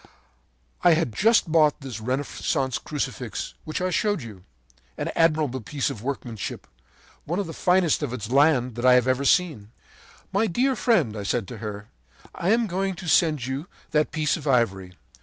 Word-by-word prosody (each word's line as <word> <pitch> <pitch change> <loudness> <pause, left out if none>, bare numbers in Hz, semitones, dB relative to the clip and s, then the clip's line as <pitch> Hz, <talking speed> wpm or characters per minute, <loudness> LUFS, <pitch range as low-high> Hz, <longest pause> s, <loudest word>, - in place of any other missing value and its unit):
“I 175 -2 +6
had 160 -8 -1
just 220 - +3
bought 155 -3 +3
this 130 -5 -6
Renaissance 130 +1 -2
Crucifix 135 -6 -4
which 155 +3 -4
I 185 0 0
showed 205 - 0
you, 105 -6 -11 0.5
an - - -3
admirable 155 -6 +2
piece 135 +5 -2
of 105 - -8
workmanship, 120 -4 -5 0.6
one 170 +4 -2
of 200 - -1
the 165 - -7
finest 180 -3 +2
of 145 -5 -2
its 115 -2 -5
land 135 -3 +3
that 120 - -4
I 125 - +8
have 125 0 +3
ever 130 +2 +1
seen. 145 - +2 0.6
“'My 210 +3 +2
dear 255 +8 +1
friend,' 180 - +2
I 105 - -4
said 105 +1 -1
to 120 - -7
her, 105 -1 -7 0.4
'I 175 - -2
am 230 +2 +3
going 190 0 -2
to 175 +1 -8
send 155 -6 +3
you 135 +6 -4 0.2
that 150 0 +1
piece 155 -2 0
of 155 -2 -8
ivory. 95 -8 +1
145 Hz, 175 wpm, -25 LUFS, 120-170 Hz, 0.6 s, I